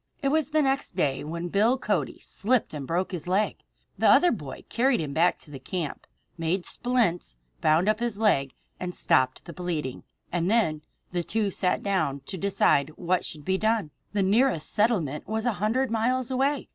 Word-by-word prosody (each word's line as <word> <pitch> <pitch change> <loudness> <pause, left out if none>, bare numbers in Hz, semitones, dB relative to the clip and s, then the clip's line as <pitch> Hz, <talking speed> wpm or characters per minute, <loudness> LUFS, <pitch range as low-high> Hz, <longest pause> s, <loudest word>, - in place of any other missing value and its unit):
It 275 - +3
was 310 -1 +1
the 310 0 +2
next 270 0 0
day, 135 -2 0
when 170 +3 -4
Bill 220 +8 +3
Cody - - -1
slipped 240 -1 0
and 140 -3 -5
broke 180 +4 -1
his 175 -3 -5
leg. 195 +4 +1 0.4
The - - +4
other 355 - +6
boy 145 - -6
carried 250 +1 +2
him 150 -3 -3
back 170 +3 +3
to 150 - -8
the 135 - -8
camp, 160 +2 -5 0.3
made 175 +3 0
splints, 230 - 0 0.3
bound 160 +5 +3
up 215 0 +2
his 235 -3 -1
leg, 140 -12 +2 0.2
and 180 -1 -4
stopped 130 0 +1
the 170 - -8
bleeding; 160 -7 -4 0.3
and 175 +1 0
then 185 -10 +2 0.3
the 175 -1 -1
two 210 +2 -1
sat 180 0 +1
down 180 -9 0
to 190 - -7
decide 155 -7 +2
what 180 +1 0
should 150 -2 -6
be 190 0 +1
done. 220 -7 +1 0.2
The 205 -1 +1
nearest 210 - +2
settlement 200 - +1
was 220 +2 -2
a 240 - +2
hundred 235 +4 +1
miles 250 +3 0
away. 275 +2 0
190 Hz, 185 wpm, -26 LUFS, 160-230 Hz, 0.4 s, other